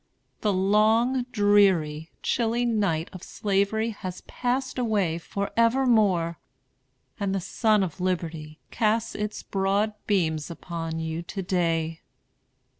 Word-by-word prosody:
The 210 - +1
long, 220 +6 +3
dreary, 190 -7 +3
chilly 235 0 +1
night 200 -9 0
of 185 - -8
Slavery 205 +4 0
has 185 -4 -7
passed 255 +1 -2
away 200 -9 +1
forevermore, 210 -4 +2 0.8
and 195 -1 -1
the - - 0
sun 210 +3 +2
of 180 -1 -5
Liberty 165 -4 -3
casts 220 0 +1
its 210 0 -4
broad 200 +2 0
beams 160 -7 0
upon 165 -1 -5
you 160 0 -3
to 190 +3 -5
day. 165 -3 0
195 Hz, 115 wpm, -26 LUFS, 170-220 Hz, 0.8 s, long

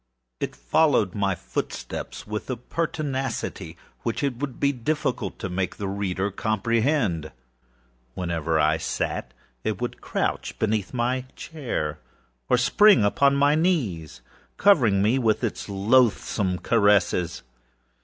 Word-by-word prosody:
It - - -3
followed 100 - +2
my 100 -2 0
footsteps - - -5
with 105 +3 -5
a 130 - -2
pertinacity 135 - -3 0.2
which 115 +4 -2
it 135 -4 -1
would 135 -1 -5
be 140 - +3
difficult 145 +4 -2
to - - -4
make 90 0 -2
the 100 - -4
reader 100 0 -2
comprehend. 110 - 0 0.8
Whenever 85 -3 -1
I 75 +1 +3
sat, - - -3 0.3
it - - -2
would - - -4
crouch - - -2
beneath 110 -2 0
my 125 +1 -1
chair, 115 - -4 0.5
or - - +5
spring 200 - +5
upon 140 +7 +3
my 145 +1 +4
knees, 135 - 0 0.4
covering 120 - +4
me 115 +6 +3
with 110 -4 +1
its - - -3
loathsome 100 -2 +2
caresses. 100 -6 +2
110 Hz, 125 wpm, -25 LUFS, 95-135 Hz, 0.8 s, or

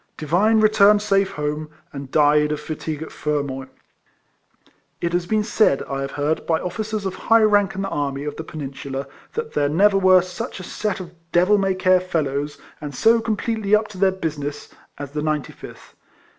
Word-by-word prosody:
Divine 190 +9 +2
returned 210 -1 +5
safe 195 -1 +1
home, 150 0 -3 0.2
and 140 -2 -7
died 150 +1 +3
of 150 - -2
fatigue 155 -1 -5
at - - -10
Fermoy. 140 -3 -3 1.3
It 170 0 -2
has 175 0 0
been 215 +1 +1
said, 210 -9 +2
I 135 0 -4
have 135 0 -4
heard, 145 +2 -1
by 160 -1 +2
officers 215 +2 -4
of 190 - -2
high 225 0 +3
rank 205 -2 +3
in 195 - -3
the 195 - -3
army 140 -3 -2
of 150 - -4
the 160 - -6
Peninsula, 140 -3 -6 0.3
that 460 +1 -4
there 145 - +1
never 195 +6 +4
were 185 -1 +6
such 180 +1 -6
a - - -7
set 210 +2 -3
of 175 -1 -10 0.2
devil 180 +5 +4
may 195 -1 +1
care 185 0 +4
fellows, 150 -5 -2 0.2
and 145 -2 -6
so 230 - +4
completely 220 -1 0
up 215 0 +1
to 195 -3 -10
their 195 0 +4
business, 150 -5 -5 0.2
as 145 -1 -7
the 150 +1 -3
95th. 150 -2 -5
175 Hz, 185 wpm, -22 LUFS, 150-200 Hz, 1.3 s, were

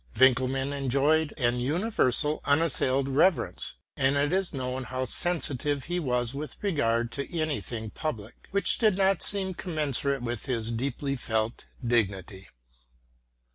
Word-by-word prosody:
Winckelmann 130 +1 +3
enjoyed 140 +3 +2
an 120 -2 +1
universal, 150 - +2
unas 155 +3 +3
sailed 135 +1 +1
reverence; 155 +7 +1 0.2
and 135 +1 +2
it 145 +3 +1
is 190 -1 +1
known 130 -2 -3
how 130 +2 -3
sensitive 145 -2 0
he 175 +1 -2
was 125 -5 -1
with 150 +2 -6
regard 120 - +1
to 140 +6 -4
any 155 -3 -1
thing 110 -3 -6
public 115 -9 -6
which 200 +1 +1
did 215 -5 +3
not 195 -1 +2
seem 190 -2 +1
commensurate 145 -6 -1
with 120 +2 -4
his 115 -3 -1
deeply 135 +3 -2
felt 110 -2 -2 0.2
dignity. 100 -4 -1
135 Hz, 135 wpm, -27 LUFS, 120-155 Hz, 0.2 s, Winckelmann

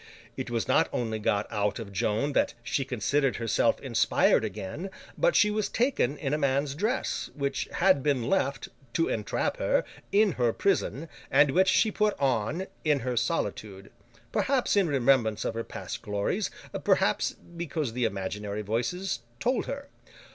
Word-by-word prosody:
It - - -4
was - - -1
not - - +3
only 110 -2 -2
got 105 -1 +1
out 105 0 0
of 110 -4 -7
Joan 110 +9 0
that - - +1
she 135 - 0
considered 135 +2 0
herself 115 -2 +1
inspired - - +3
again, 145 - -5 0.3
but, - - +2
she 210 -1 +5
was 210 -1 -1
taken 230 - +1
in 140 -1 -2
a 150 - +1
man's 140 0 +1
dress, 215 - -1
which 140 -1 -2
had 185 -5 +4
been 130 -4 0
left—to 140 -3 -1
entrap 105 -2 -1
her—in 205 0 +1
her 120 -6 +1
prison, 165 -5 0 0.2
and 145 -2 +5
which 190 +6 +4
she 220 +3 +3
put 210 0 0
on, 135 - 0 0.2
in 150 -3 +2
her 125 0 -2
solitude; 100 -3 -2 0.4
perhaps, 265 -5 +1
in 200 -3 +4
remembrance 125 -6 +2
of - - -1
her 115 0 -3
past - - -7
glories, 105 - -1 0.3
perhaps, - - +2
because 165 -7 -5
the 125 0 0
imaginary 100 +1 -3
Voices 120 - -2 0.2
told 250 +1 0
her. 280 0 -5
140 Hz, 155 wpm, -28 LUFS, 115-185 Hz, 0.4 s, she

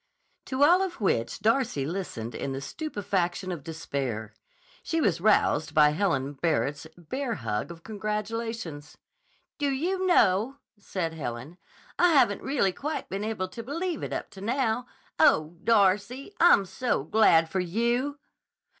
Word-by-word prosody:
To 260 +2 +1
all 350 +5 +6
of 375 -2 -3
which 115 - 0
Darcy 225 - +1
listened 150 - -4
in 135 - -4
the 135 - -3
stupefaction 185 - -2
of 165 -6 -5
despair. 135 -9 -4 0.5
She 330 -2 -1
was 180 - +1
roused 175 -7 +2
by 150 -1 +6
Helen 150 -5 0
Barrett's 145 0 -1
bear 235 - -3
hug 110 -4 -3
of 170 -1 -11
congratulations. 210 -5 -4 0.6
"Do 290 -1 +1
you 365 +8 -1
know," 225 - +3 0.2
said 180 -5 -3
Helen, 135 +2 -6 0.4
"I 355 -1 +5
haven't 235 -8 +4
really 260 -9 +1
quite 300 +8 -4
been 195 +2 -3
able 215 -4 -3
to 230 - -7
believe 330 +7 -3
it - - -4
up - - -4
to 190 - -11
now. 245 +1 0 0.3
Oh, 155 +2 +4
Darcy, 210 - +2
I'm 335 - +6
so 190 - -1
glad 165 -2 +4
for 190 +4 -2
you!" 235 +10 0
200 Hz, 145 wpm, -27 LUFS, 160-255 Hz, 0.6 s, all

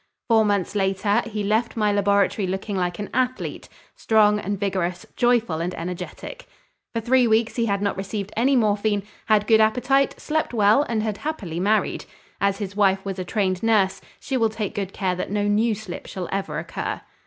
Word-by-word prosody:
Four 220 -1 +5
months 200 -3 0
later, 200 +2 +1
he 215 -2 -3
left 220 +3 0
my 210 -1 +2
laboratory 200 0 +2
looking 190 +2 -3
like 175 -2 -1
an 205 - -6
athlete, 255 0 -2 0.3
strong 210 -1 +3
and 200 -1 -3
vigorous, 185 -3 -2
joyful 235 -9 +2
and 180 +2 -3
energetic. 180 - -7 0.5
For 230 - 0
three 250 +1 +3
weeks 225 +1 +2
he 235 -1 0
had 200 -1 0
not 200 - -1
received 200 +1 -4
any 265 +5 +3
morphine, 210 -3 +1 0.2
had 215 -1 +3
good 220 0 +5
appetite, 250 +5 +2
slept 310 -5 -1
well, 210 +4 +5
and 220 -2 0
had 215 -2 -2
happily 200 - -4
married. 210 +4 +1 0.3
As 200 0 +1
his 200 -2 -5
wife 195 -2 +2
was 195 -1 -4
a - - -2
trained 185 -1 -1
nurse, 210 -4 +2 0.2
she 265 - -2
will 225 -2 +2
take 215 -2 -4
good 195 -2 -3
care 190 -2 -1
that 180 - -4
no 205 +1 0
new 215 +2 +2
slip 200 -4 -8
shall 180 -2 -5
ever 195 0 -2
occur. - - -4
205 Hz, 190 wpm, -23 LUFS, 195-225 Hz, 0.5 s, Four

